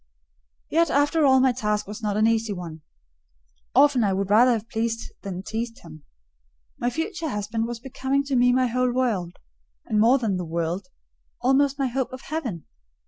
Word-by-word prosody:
Yet 335 Hz, +1 st, +3 dB
after 290 Hz, +2 st, +3 dB
all 265 Hz, -1 st, +6 dB
my 260 Hz, 0 st, +4 dB
task 210 Hz, -4 st, -1 dB
was 210 Hz, +3 st, -8 dB
not 210 Hz, -2 st, -1 dB
an 215 Hz, -, +3 dB
easy 225 Hz, -1 st, +1 dB
one; 170 Hz, -4 st, -8 dB, 0.9 s
often 275 Hz, -2 st, +5 dB
I 200 Hz, -2 st, +2 dB
would 195 Hz, +1 st, -2 dB
rather 240 Hz, +4 st, +6 dB
have 225 Hz, -1 st, -3 dB
pleased 230 Hz, 0 st, -3 dB
than 190 Hz, -2 st, -6 dB
teased 230 Hz, +3 st, -5 dB
him. 155 Hz, -3 st, -13 dB, 0.7 s
My 245 Hz, -, 0 dB
future 325 Hz, -, -3 dB
husband 220 Hz, 0 st, -2 dB
was 240 Hz, -1 st, -5 dB
becoming 265 Hz, +2 st, -1 dB
to 280 Hz, -1 st, -2 dB
me 245 Hz, 0 st, +4 dB
my 255 Hz, +1 st, +3 dB
whole 250 Hz, +1 st, +1 dB
world; 220 Hz, -9 st, -1 dB, 0.5 s
and 215 Hz, -, 0 dB
more 235 Hz, +5 st, +5 dB
than 220 Hz, -7 st, -1 dB
the 180 Hz, -, -3 dB
world: 170 Hz, +5 st, -3 dB, 0.5 s
almost 270 Hz, +2 st, +2 dB
my 275 Hz, -, 0 dB
hope 260 Hz, 0 st, -2 dB
of 255 Hz, 0 st, -8 dB
heaven. 250 Hz, -, -5 dB
235 Hz, 180 wpm, -24 LUFS, 210-265 Hz, 0.9 s, all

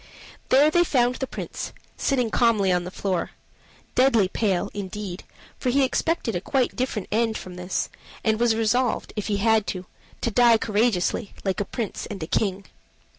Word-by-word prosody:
There 285 Hz, +4 st, +6 dB
they 345 Hz, +2 st, +4 dB
found 250 Hz, -6 st, +2 dB
the 265 Hz, -, -3 dB
Prince, -, -, -6 dB, 0.2 s
sitting 250 Hz, -5 st, 0 dB
calmly 215 Hz, -5 st, +3 dB
on 180 Hz, -1 st, +1 dB
the -, -, -4 dB
floor 185 Hz, -2 st, -2 dB, 0.6 s
deadly 245 Hz, -6 st, +4 dB
pale, 200 Hz, -1 st, 0 dB
indeed, 200 Hz, -2 st, -5 dB, 0.4 s
for 255 Hz, -, 0 dB
he 275 Hz, +2 st, +3 dB
expected 265 Hz, -, 0 dB
a 175 Hz, -, -1 dB
quite 260 Hz, +3 st, 0 dB
different 245 Hz, -6 st, -2 dB
end 225 Hz, 0 st, +1 dB
from 185 Hz, -, -9 dB
this, 180 Hz, +1 st, -2 dB, 0.4 s
and 220 Hz, -1 st, +2 dB
was 235 Hz, -2 st, +3 dB
resolved, 230 Hz, +2 st, +1 dB
if 210 Hz, -2 st, -3 dB
he 205 Hz, -2 st, 0 dB
had 220 Hz, 0 st, +3 dB
to 185 Hz, -, -3 dB
die, -, -, -17 dB, 0.4 s
to 235 Hz, -, 0 dB
die 235 Hz, 0 st, +6 dB
courageously, 215 Hz, -2 st, 0 dB
like 190 Hz, -1 st, -1 dB
a 205 Hz, -, 0 dB
Prince 230 Hz, -1 st, -4 dB
and 195 Hz, -5 st, -6 dB
a -, -, -2 dB
King. 195 Hz, +2 st, -1 dB
220 Hz, 175 wpm, -24 LUFS, 195-245 Hz, 0.6 s, There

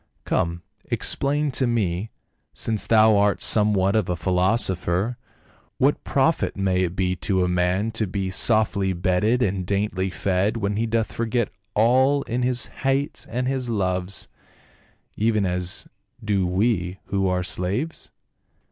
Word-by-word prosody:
Come, 85 Hz, -1 st, -1 dB, 0.2 s
explain 145 Hz, +1 st, -1 dB
to 130 Hz, 0 st, +1 dB
me 105 Hz, -3 st, -1 dB, 0.2 s
— -, -, -50 dB
since 110 Hz, -3 st, 0 dB
thou 110 Hz, -1 st, +5 dB
art 100 Hz, 0 st, +2 dB
some 105 Hz, -1 st, +4 dB
what 95 Hz, +1 st, +1 dB
of 105 Hz, -5 st, +1 dB
a 90 Hz, -, 0 dB
philosopher, 95 Hz, +2 st, 0 dB, 0.6 s
what -, -, +1 dB
profit -, -, 0 dB
may 95 Hz, -1 st, +1 dB
it 90 Hz, -1 st, -1 dB
be 90 Hz, -1 st, 0 dB
to 95 Hz, +1 st, 0 dB
a -, -, +1 dB
man 90 Hz, +4 st, 0 dB
to 110 Hz, -1 st, -2 dB
be 95 Hz, 0 st, -3 dB
softly 100 Hz, -2 st, +3 dB
bedded 95 Hz, +7 st, +1 dB
and 95 Hz, -3 st, -1 dB
daintily 100 Hz, 0 st, -1 dB
fed 95 Hz, +4 st, 0 dB
when 100 Hz, -2 st, -1 dB
he 115 Hz, +2 st, -1 dB
doth 115 Hz, 0 st, -1 dB
forget 115 Hz, -1 st, -1 dB, 0.3 s
all 130 Hz, +6 st, +3 dB
in 120 Hz, +2 st, -3 dB
his 125 Hz, -1 st, +1 dB, 0.2 s
hates 135 Hz, +1 st, -1 dB
and 125 Hz, +2 st, -2 dB
his 130 Hz, -2 st, -2 dB
loves, 95 Hz, -3 st, -1 dB, 0.9 s
even 110 Hz, -2 st, +1 dB
as 90 Hz, 0 st, -1 dB, 0.4 s
do 100 Hz, -3 st, +1 dB
we 90 Hz, -1 st, 0 dB
who 95 Hz, -1 st, -1 dB
are 90 Hz, -1 st, 0 dB
slaves 95 Hz, -, -2 dB
100 Hz, 145 wpm, -23 LUFS, 90-115 Hz, 0.9 s, thou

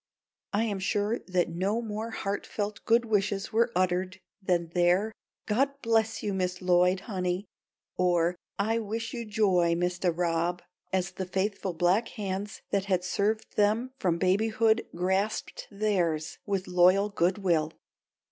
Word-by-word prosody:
I 210 Hz, +2 st, +1 dB
am 205 Hz, -4 st, -2 dB
sure 205 Hz, +4 st, 0 dB
that 180 Hz, -2 st, +1 dB
no 190 Hz, +6 st, -1 dB
more 220 Hz, 0 st, -4 dB
heartfelt 205 Hz, 0 st, -4 dB
good 235 Hz, +1 st, +4 dB
wishes 205 Hz, -2 st, 0 dB
were 230 Hz, +2 st, +3 dB
uttered 185 Hz, +1 st, 0 dB, 0.2 s
than 175 Hz, -3 st, 0 dB
their 180 Hz, +5 st, +2 dB, 0.3 s
"God 275 Hz, +6 st, +1 dB
bless 225 Hz, -1 st, +1 dB
you, 205 Hz, -, -1 dB
Miss 180 Hz, -1 st, -1 dB
Lloyd, 180 Hz, +1 st, +3 dB
honey," 185 Hz, -2 st, -2 dB, 0.5 s
or 175 Hz, -1 st, +2 dB, 0.2 s
"I 225 Hz, +3 st, +1 dB
wish 225 Hz, +1 st, -4 dB
you 235 Hz, -2 st, -4 dB
joy, 190 Hz, -6 st, +2 dB
Mistah 175 Hz, +1 st, 0 dB
Rob," 170 Hz, +1 st, -1 dB, 0.3 s
as 185 Hz, -1 st, 0 dB
the 185 Hz, 0 st, -5 dB
faithful 190 Hz, 0 st, -1 dB
black 180 Hz, +7 st, +2 dB
hands 200 Hz, 0 st, -5 dB
that 200 Hz, -1 st, +1 dB
had 185 Hz, -2 st, +1 dB
served 205 Hz, +4 st, -1 dB
them 215 Hz, +5 st, +2 dB
from 175 Hz, -3 st, +1 dB
babyhood 220 Hz, +5 st, +2 dB
grasped 190 Hz, +5 st, -1 dB
theirs 185 Hz, -7 st, -1 dB
with 195 Hz, -2 st, -1 dB
loyal 185 Hz, +3 st, +4 dB
good 185 Hz, -1 st, +1 dB
will. 165 Hz, -6 st, +1 dB
195 Hz, 140 wpm, -28 LUFS, 180-215 Hz, 0.5 s, good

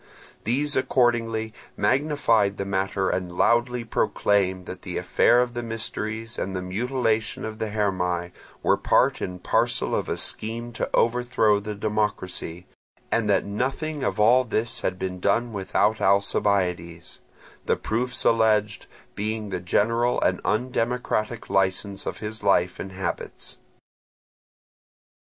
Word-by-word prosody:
These 145 Hz, +5 st, +2 dB
accordingly 120 Hz, -4 st, +1 dB, 0.2 s
magnified 125 Hz, -8 st, +2 dB
the 100 Hz, -, -3 dB
matter 95 Hz, 0 st, 0 dB
and 90 Hz, -1 st, -2 dB
loudly 120 Hz, +1 st, +2 dB
proclaimed 100 Hz, -4 st, +1 dB
that 95 Hz, +1 st, -8 dB
the 90 Hz, -, -5 dB
affair 120 Hz, +7 st, +4 dB
of 120 Hz, -1 st, -6 dB
the 120 Hz, -, -3 dB
mysteries 115 Hz, 0 st, -4 dB
and 95 Hz, 0 st, -3 dB
the 90 Hz, -, -2 dB
mutilation 115 Hz, +3 st, -1 dB
of 110 Hz, 0 st, -6 dB
the 110 Hz, -, -2 dB
Hermae 90 Hz, -4 st, -1 dB, 0.3 s
were -, -, +3 dB
part -, -, +2 dB
and 90 Hz, 0 st, -5 dB
parcel -, -, +1 dB
of -, -, -1 dB
a -, -, -1 dB
scheme 115 Hz, +2 st, -1 dB
to -, -, -2 dB
overthrow 115 Hz, -3 st, +2 dB
the 105 Hz, +1 st, -5 dB
democracy, 100 Hz, -5 st, -2 dB, 0.5 s
and 110 Hz, -3 st, +1 dB
that 100 Hz, -, +3 dB
nothing 135 Hz, +8 st, -2 dB
of -, -, -1 dB
all 120 Hz, +4 st, +5 dB
this 115 Hz, 0 st, -1 dB
had 95 Hz, -, -1 dB
been 90 Hz, -1 st, -4 dB
done 115 Hz, +5 st, +1 dB
without 105 Hz, +2 st, +1 dB
Alcibiades; 95 Hz, -4 st, +1 dB, 0.5 s
the -, -, +3 dB
proofs 120 Hz, +3 st, -1 dB
alleged 110 Hz, -2 st, +2 dB, 0.3 s
being 110 Hz, 0 st, -3 dB
the 90 Hz, -2 st, -3 dB
general 115 Hz, +6 st, +1 dB
and -, -, +1 dB
undemocratic 120 Hz, -1 st, -1 dB
licence 95 Hz, +1 st, 0 dB
of -, -, -3 dB
his 110 Hz, 0 st, -6 dB
life 90 Hz, -3 st, +2 dB
and 95 Hz, -, -6 dB
habits. 95 Hz, -1 st, -5 dB
110 Hz, 135 wpm, -25 LUFS, 95-120 Hz, 0.5 s, all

